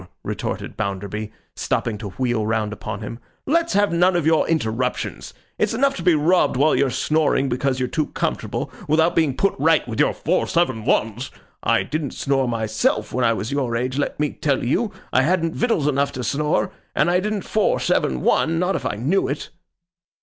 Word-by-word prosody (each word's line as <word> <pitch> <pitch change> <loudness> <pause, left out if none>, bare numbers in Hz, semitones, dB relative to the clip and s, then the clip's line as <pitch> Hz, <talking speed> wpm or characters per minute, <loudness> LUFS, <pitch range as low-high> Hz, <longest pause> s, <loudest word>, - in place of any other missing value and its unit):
retorted - - -4
Bounderby, 100 +2 -4 0.2
stopping 115 - -1
to 105 -2 -5
wheel 120 +1 -1
round 110 -1 -1
upon 110 +1 -6
him, 110 +2 -6 0.3
'let's 335 +3 +1
have 205 0 +3
none 180 +2 +3
of 170 -4 +1
your 160 -1 +3
interruptions. 125 -5 -2 0.3
It's - - +1
enough 275 +3 +2
to - - -5
be 175 - +4
robbed 155 -2 +3
while 150 +3 +4
you're 140 -1 +2
snoring 145 +1 +1
because 130 +1 0
you're 130 - 0
too 155 +4 -1
comfortable, - - -3 0.2
without 160 +3 +3
being 150 -5 +2
put 195 - +2
right 160 0 +3
with 115 -2 -5
your - - +3
four - - 0
seven 130 -11 0
ones. 115 +4 0 0.3
I - - +2
didn't 155 -3 -4
snore, 135 -2 0
myself, 110 -2 0
when 125 - 0
I 115 - +4
was 110 +2 -4
your 130 -4 -1
age, 130 +3 -1
let 145 - -2
me 150 -1 +1
tell 140 -3 -1
you. 205 - 0 0.2
I 130 - +5
hadn't 165 +2 +1
victuals 225 - +1
enough 140 -1 +1
to 125 - -4
snore. 150 +6 0 0.2
And - - +3
I 180 - +3
didn't 210 0 -2
four 215 - +1
seven 65 -2 0
one. 165 +1 +2
Not 180 +3 +1
if - - -2
I - - -2
knew 145 - +1
it. 140 +2 -4
140 Hz, 195 wpm, -22 LUFS, 115-165 Hz, 0.3 s, I